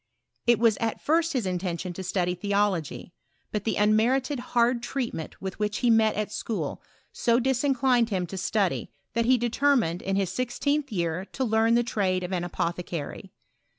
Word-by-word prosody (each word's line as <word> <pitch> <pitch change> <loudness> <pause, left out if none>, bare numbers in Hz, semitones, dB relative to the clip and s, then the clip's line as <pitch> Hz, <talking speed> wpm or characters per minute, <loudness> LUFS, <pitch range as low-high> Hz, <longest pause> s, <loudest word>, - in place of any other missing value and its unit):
It 240 -1 +6
was 225 -1 +3
at 225 -1 -2
first 325 +1 +1
his 250 -6 0
intention 180 -1 -3
to 190 - -6
study 180 -1 0
theology; 195 -3 -1 0.4
but 210 -2 -3
the 220 - 0
unmerited 245 +6 +2
hard 240 0 +1
treatment 240 - -4
which 210 +2 -3
he 240 - +3
metwithatschaol 220 0 0 0.3
so 235 0 +2
disiaclined 260 -2 +2
him 185 -4 -1
to 185 - -8
study, 190 0 0 0.2
that 230 0 +1
he 255 +1 +5
determined, 240 -7 +1
in 195 0 -1
his 195 -2 0
sixteenth 275 +6 -1
year, 170 -2 -1
to 265 - -1
leam 225 0 +3
the 240 - +3
trade 190 -5 0
of 180 +1 -4
an 175 -1 -1
apothecary. 170 -2 -4
220 Hz, 155 wpm, -26 LUFS, 185-245 Hz, 0.4 s, It